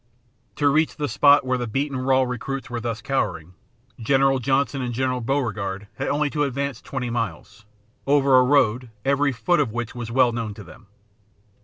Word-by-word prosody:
To 145 Hz, -, +1 dB
reach 155 Hz, +3 st, +2 dB
the 150 Hz, -1 st, -2 dB
spot 140 Hz, +3 st, +4 dB
where 130 Hz, 0 st, 0 dB
the 120 Hz, -, -3 dB
beaten 135 Hz, +5 st, -2 dB
raw 130 Hz, +1 st, +2 dB
recruits 130 Hz, +1 st, -5 dB
were 120 Hz, -, -3 dB
thus 115 Hz, -1 st, -4 dB
cowering, 90 Hz, -, -2 dB, 0.5 s
General 135 Hz, +3 st, +2 dB
Johnston 135 Hz, +2 st, 0 dB
and 120 Hz, -2 st, -3 dB
General 130 Hz, 0 st, -1 dB
Beauregard 110 Hz, -6 st, -2 dB
had -, -, -1 dB
to 150 Hz, 0 st, 0 dB
advance 140 Hz, 0 st, -2 dB
only -, -, -17 dB
twenty 125 Hz, -3 st, -3 dB
miles, 110 Hz, -3 st, -5 dB, 0.4 s
over 140 Hz, -1 st, +4 dB
a -, -, +5 dB
road 125 Hz, -3 st, +2 dB, 0.2 s
every 140 Hz, +1 st, +2 dB
foot 175 Hz, +8 st, +1 dB
of 140 Hz, -7 st, +1 dB
which 120 Hz, 0 st, -4 dB
was 120 Hz, -2 st, -6 dB
well 125 Hz, 0 st, +3 dB
known 115 Hz, -3 st, -4 dB
to 105 Hz, -, -10 dB
them. 100 Hz, +5 st, -16 dB
130 Hz, 180 wpm, -23 LUFS, 115-140 Hz, 0.5 s, a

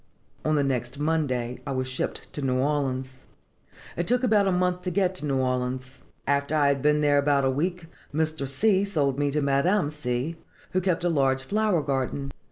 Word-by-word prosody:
On 155 Hz, 0 st, +1 dB
the 145 Hz, -, +2 dB
next 130 Hz, -1 st, -2 dB
Monday 140 Hz, -6 st, -1 dB
I -, -, -2 dB
was 130 Hz, 0 st, -1 dB
shipped 130 Hz, +1 st, -4 dB
to 145 Hz, -, -4 dB
New 130 Hz, -2 st, +1 dB
Orleans. 130 Hz, -2 st, -1 dB, 0.8 s
"It 170 Hz, -, -2 dB
took 245 Hz, +2 st, +2 dB
about 210 Hz, -5 st, +4 dB
a -, -, +3 dB
month 180 Hz, 0 st, +1 dB
to 180 Hz, -, -2 dB
get 185 Hz, +1 st, +1 dB
to 150 Hz, -, -2 dB
New 135 Hz, -1 st, +1 dB
Orleans. 125 Hz, 0 st, -2 dB, 0.3 s
After 140 Hz, +2 st, +1 dB
I 145 Hz, -2 st, +4 dB
had 140 Hz, -1 st, +1 dB
been 150 Hz, +1 st, +3 dB
there 145 Hz, -1 st, +4 dB
about 140 Hz, -1 st, +2 dB
a 135 Hz, -, +3 dB
week, 170 Hz, +5 st, -2 dB, 0.3 s
Mr. 155 Hz, -2 st, 0 dB
C. 195 Hz, +7 st, +2 dB
sold 145 Hz, -9 st, 0 dB
me 145 Hz, 0 st, +2 dB
to 145 Hz, +1 st, 0 dB
Madame 145 Hz, +5 st, +2 dB
C., 145 Hz, +2 st, -3 dB, 0.3 s
who 185 Hz, -, +1 dB
keeps 175 Hz, -2 st, 0 dB
a -, -, +3 dB
large 135 Hz, -4 st, +2 dB
flower 205 Hz, 0 st, +1 dB
garden. 135 Hz, 0 st, -2 dB
145 Hz, 195 wpm, -26 LUFS, 135-170 Hz, 0.8 s, about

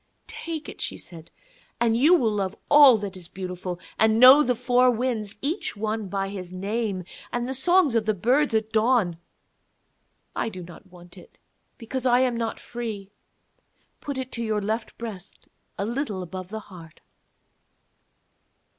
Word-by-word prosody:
'Take 325 Hz, -2 st, -6 dB
it,' -, -, -9 dB
she -, -, -3 dB
said, 165 Hz, -1 st, -11 dB, 0.5 s
'and 230 Hz, -1 st, +2 dB
you 300 Hz, +9 st, +5 dB
will 235 Hz, -10 st, +2 dB
love 200 Hz, -1 st, -2 dB, 0.2 s
all 285 Hz, -5 st, +8 dB
that 200 Hz, -2 st, -6 dB
is 180 Hz, -2 st, -10 dB
beautiful, 180 Hz, -1 st, -6 dB, 0.2 s
and 220 Hz, 0 st, +4 dB
know 260 Hz, +4 st, +9 dB
the 250 Hz, -3 st, +1 dB
four 250 Hz, +1 st, +3 dB
winds, 230 Hz, -4 st, -2 dB
each 315 Hz, -, -2 dB
one 215 Hz, 0 st, -3 dB
by 195 Hz, +1 st, -2 dB
his 190 Hz, -3 st, -7 dB
name, 200 Hz, 0 st, -3 dB, 0.3 s
and 240 Hz, 0 st, -2 dB
the 265 Hz, -, -3 dB
songs 345 Hz, +1 st, +4 dB
of 225 Hz, -2 st, 0 dB
the 215 Hz, -, +3 dB
birds 250 Hz, +6 st, +2 dB
at 220 Hz, 0 st, 0 dB
dawn. 220 Hz, -6 st, +2 dB, 1.2 s
I -, -, -1 dB
do 185 Hz, -4 st, -8 dB
not 175 Hz, +3 st, -13 dB
want 175 Hz, 0 st, -15 dB
it, -, -, -18 dB, 0.4 s
because 260 Hz, +2 st, -3 dB
I 245 Hz, +1 st, +4 dB
am 250 Hz, -2 st, +1 dB
not 230 Hz, -1 st, -3 dB
free. 220 Hz, -5 st, -6 dB, 0.9 s
Put 285 Hz, -2 st, -5 dB
it 260 Hz, -1 st, -5 dB
to 235 Hz, -, -3 dB
your 215 Hz, -2 st, 0 dB
left 220 Hz, +3 st, -4 dB
breast 200 Hz, -5 st, -8 dB, 0.3 s
a 200 Hz, -, -2 dB
little 225 Hz, -5 st, -3 dB
above 185 Hz, +1 st, -7 dB
the 220 Hz, +1 st, -6 dB
heart.' 170 Hz, -6 st, -14 dB
220 Hz, 165 wpm, -25 LUFS, 190-250 Hz, 1.2 s, know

